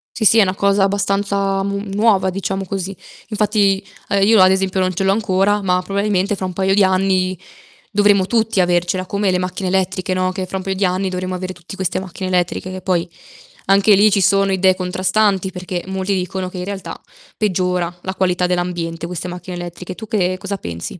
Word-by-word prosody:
Sì, 225 - -1
sì, 220 - +6
è - - +8
una 185 -2 +1
cosa 200 0 +2
abbastanza 195 0 0
mu 200 0 -2
nuova, 205 -2 +3
diciamo 195 +1 -3
così. 195 +1 -4 0.3
Infatti, 205 -2 +2 0.3
ehm, 200 -1 +2
io 220 -1 +5
ad 185 0 +7
esempio 190 0 0
non 185 0 0
ce 185 - -2
l'ho 195 - +3
ancora, 205 -1 +1
ma 180 -2 +1
probabilmente 200 +1 0
fra 190 - -4
un 185 - -4
paio 190 +1 +1
di 200 0 +4
anni 185 -1 +1 0.5
dovremo 205 -2 +4
tutti 220 0 +1
avercela, 175 +1 +1
come 200 +1 0
le 180 - +1
macchine 180 +1 -3
elettriche, 185 0 0
no. 185 0 0
Che 185 0 -4
fra 190 - -4
un 190 - -5
paio 190 0 -2
di 195 - -1
anni 185 +1 0
dovremo 185 0 -3
avere 185 0 -5
tutti 175 +2 -11
queste 190 -3 -1
macchine 185 0 -6
elettriche, 180 0 -1
che 185 0 -6
poi 180 -2 0 0.6
anche 200 +2 +5
lì 205 +2 +5
ci 200 - +3
sono 195 +1 +3
idee 190 0 +3
contrastanti, 190 +1 +1
perché 180 -1 -5
molti 190 +1 -2
dicono 185 0 -3
che 185 - -9
in 180 - -4
realtà 195 -1 -6 0.4
peggiora 180 -4 0
la 190 +1 -5
qualità 180 -1 +1
dell'ambiente, 175 -2 -2
queste 180 0 -4
macchine 180 +1 -7
elettriche. 175 +1 -7
Tu 220 - -9
che 185 -5 0
cosa 200 +1 -4
pensi? 85 - -6
190 Hz, 205 wpm, -18 LUFS, 180-200 Hz, 0.6 s, è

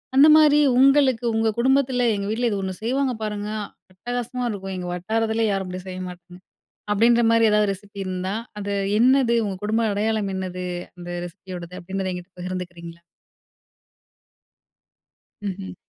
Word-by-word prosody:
அந்த 280 +3 +8
மாரி 295 -1 +6 0.2
உங்களுக்கு 270 -3 +4
உங்க 225 0 +2
குடும்பத்தில, 260 -1 +2
"எங்க 200 0 -3
வீட்ல 240 +2 +1
இது 205 -2 -1
ஒண்ணு 190 -1 -3
செய்வாங்க 260 +2 0
பாருங்க 210 -1 -3 0.4
அட்டகாசமா 245 +4 -4
இருக்கும். 195 -2 -5
எங்க 180 -1 -5
வட்டாரத்திலே 220 +5 0
யாரும் 195 -2 -2
அப்டி 185 0 -5
செய்ய 185 0 -6
மாட்டாங்க." 180 0 -13 0.5
அப்டீன்ற 235 +3 +4
மாரி 230 0 +4
எதாவது 210 -1 +3
ரெசிப்பி 200 +1 -12
இருந்தா, 185 +1 -3 0.3
"அது 200 0 -3 0.3
என்னது? 250 -1 +4
உங்க 195 -2 -3
குடும்ப 225 +2 +1
அடையாளம் 210 -1 0
என்னது 180 -1 -4 0.3
அந்த 175 0 -9 0.2
ரெசிப்பியோடது?" 175 0 -9
அப்படீன்றத 190 +2 -3
என்கிட்ட 180 +1 -7
பகிர்ந்துக்கிறீங்களா? 175 -2 -6 2.4
ம்ஹ்ம். 190 -1 -5
205 Hz, 135 wpm, -23 LUFS, 185-235 Hz, 2.4 s, அந்த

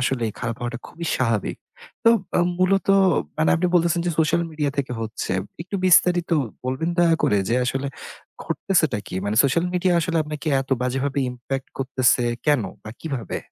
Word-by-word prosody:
আসলেই 120 -4 0
খারাপ 115 -2 -3
হওয়াটা 120 0 -4
খুবই 170 0 -7
স্বাভাবিক। 115 -5 0 0.5
তো, - - +7 0.3
অ - - +5 0.2
মূলত 195 +1 +2 0.5
মানে 155 - +3
আপনি 175 +1 +1
বলতেছেন 170 0 +3
যে - - +2
social 160 +2 +3
media 150 -2 -1
থেকে 135 -2 -1
হচ্ছে। 110 -3 -4 0.3
একটু 185 +3 -9
বিস্তারিত 175 -1 +4 0.3
বলবেন 130 +6 -1
দয়া 170 -1 +5
করে 105 - +3
যে 115 - +1
আসলে 135 +3 -2 0.6
ঘটতেছেটা 155 - +1
কি? - - -8
মানে 100 +1 -1
social 150 +6 +2
media 180 +1 +2
আসলে 165 0 -1
আপনাকে 150 +1 -7
এত 135 - -8
বাজেভাবে 135 +3 -1
impact 130 +2 -5
করতেছে 130 -1 +2 0.2
কেন 145 -6 +3 0.2
বা 110 - -7
কিভাবে? 135 -8 -4
140 Hz, 165 wpm, -23 LUFS, 125-170 Hz, 0.6 s, তো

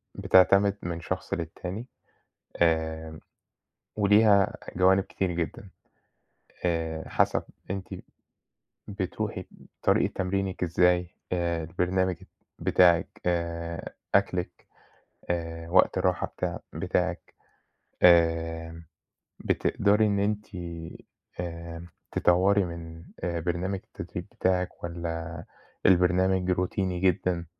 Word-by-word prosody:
بتعتمد 100 +2 +5
من 85 -1 -4
شخص 95 +2 -4
للتاني 90 +5 -5 0.8
آمم 80 -1 0 0.8
وليها 105 -1 +5 0.2
جوانب 95 +1 +4
كتير 95 -2 -2
جدًا، 85 +3 -4 1.0
آآ 80 -2 -1
حسب - - +2 0.3
أنتِ 95 -1 -4 0.9
بتروحي 100 0 -3
ب - - -19 0.4
طريقة - - +3
تمرينِك 95 0 -2
إزاي، 90 +1 +2 0.2
آآ 85 -2 0
البرنامج 90 +2 0
الت - - -15 0.3
بتاعِك 85 -2 +3
آآ 85 -1 -2 0.2
أكلِك، 90 -3 0 0.6
آآ 85 -1 -3
وقت 90 +1 +4
الراحة - - +1
بتاع - - -4
بتاعِك، - - -2 0.7
آمم 80 -1 +3 0.6
بتقدرى 105 +2 +2
إن 100 -1 +1
أنتِ 105 +1 0 0.9
آمم 85 -1 -6 0.3
تطوري 95 +3 +3
من 85 -1 -8 0.2
آآ 85 -1 -2
برنامج 90 +3 -2
التدريب - - -7
بتاعِك 90 -1 -1
والّا 85 -1 -5 0.4
البرنامج 95 0 +3
روتيني 90 0 -1
جدًا، 90 -2 +1
90 Hz, 95 wpm, -27 LUFS, 85-95 Hz, 1.0 s, بتعتمد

